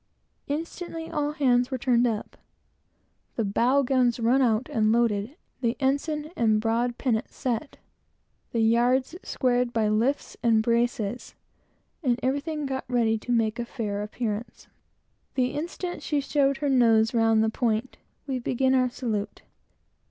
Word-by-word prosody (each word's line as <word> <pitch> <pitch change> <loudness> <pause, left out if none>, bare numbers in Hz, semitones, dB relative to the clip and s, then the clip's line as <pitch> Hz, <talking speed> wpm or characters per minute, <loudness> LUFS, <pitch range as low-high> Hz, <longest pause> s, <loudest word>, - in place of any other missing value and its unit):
Instantly, 330 +2 -5
all 295 -2 -1
hands 250 -4 +2
were 260 - -2
turned 245 -1 +2
up, 220 -3 -4 1.0
the 225 - 0
bow 245 +7 +2
guns 250 -2 +2
run 240 +4 +3
out 235 0 +2
and 215 -1 +2
loaded, 230 +1 +1 0.3
the 235 -1 0
ensign 295 +3 -1
and 220 -2 +2
broad 235 +2 0
pennant 240 -2 -1
set, 255 +2 -3 0.7
the 230 - 0
yards 245 +5 +2
squared 245 -1 0
by 225 -2 +1
lifts 230 +7 0
and 225 -2 +3
braces, 235 -1 -1 0.7
and 250 -5 +1
everything 290 +3 -1
got 265 -1 -3
ready 235 -3 +2
to 245 - -5
make 225 -1 +1
a 235 - -3
good 205 -3 -2
appearance. 215 +1 -5 0.7
The 255 -2 +1
instant 345 +4 -5
she 295 -3 0
showed 275 -1 +1
her 290 +1 -2
nose 225 -4 +4
round 225 -1 +3
the 220 - +2
point, 230 +1 -1 0.3
we 265 -3 -2
began 260 +2 +1
our 255 -1 +3
salute. 225 -5 -4
245 Hz, 145 wpm, -26 LUFS, 225-270 Hz, 1.0 s, nose